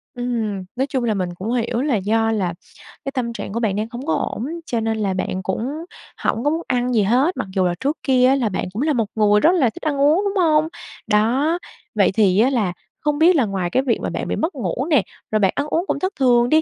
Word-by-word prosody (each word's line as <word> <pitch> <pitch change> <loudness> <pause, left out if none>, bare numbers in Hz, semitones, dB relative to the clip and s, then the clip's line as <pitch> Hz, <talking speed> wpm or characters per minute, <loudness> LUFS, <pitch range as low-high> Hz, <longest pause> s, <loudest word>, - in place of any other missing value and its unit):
Ừm, 230 -5 -2
nói 265 +2 0
chung 265 -3 -1
là 225 -2 +1
mình 185 -3 -2
cũng 195 +6 -4
hiểu 235 0 0
là 280 -3 +1
do 225 +3 +1
là 190 -6 -1 0.5
cái 275 - -2
tâm 245 -3 -2
trạng 200 - -6
của 230 - -1
bạn 215 -5 0
đang 215 +2 -1
hông 245 +2 -6
có 325 - +1
ổn, 230 - -2 0.2
cho 235 -6 -1
nên 225 0 -1
là 200 -3 0
bạn 185 0 -3
cũng 220 +8 -2 0.5
hổng 230 - 0
có 290 - +3
muốn 325 +2 -1
ăn 250 -1 0
gì 220 -3 +3
hết, 255 - +2
mặc - - -3
dù 190 -1 +2
là 175 - +1
trước 285 +4 -1
kia 255 -3 +4
á 265 - +4
là 245 -5 0
bạn 190 - -2
cũng 220 - -3
là 305 +1 +2
một 230 -4 +1
người 210 -1 +4
rất 320 - +5
là 275 -9 +3
thích 220 - -12
ăn 290 -3 -1
uống, 305 +7 +4
đúng 400 0 -1
hông? 310 -1 +3 0.4
Đó. 240 +10 +2 0.4
Vậy 205 -2 +4
thì 195 -2 +3
á 240 +4 +5
là 215 -9 0 0.3
không 295 -1 0
biết 345 +3 +6
là 270 -6 +3
ngoài 190 -4 -2
cái 260 +9 +1
việc 245 -4 +1
mà - - -2
bạn - - -4
bị - - -1
mất 320 +1 -2
ngủ 245 +1 -2
nè, 285 - +4 0.3
rồi 215 - +2
bạn 195 -3 +3
ăn 285 - -1
uống 335 +4 0
cũng - - -1
thất 375 +2 -1
thường 245 -2 +4
đi, 315 +2 +5
240 Hz, 265 wpm, -21 LUFS, 210-280 Hz, 0.5 s, biết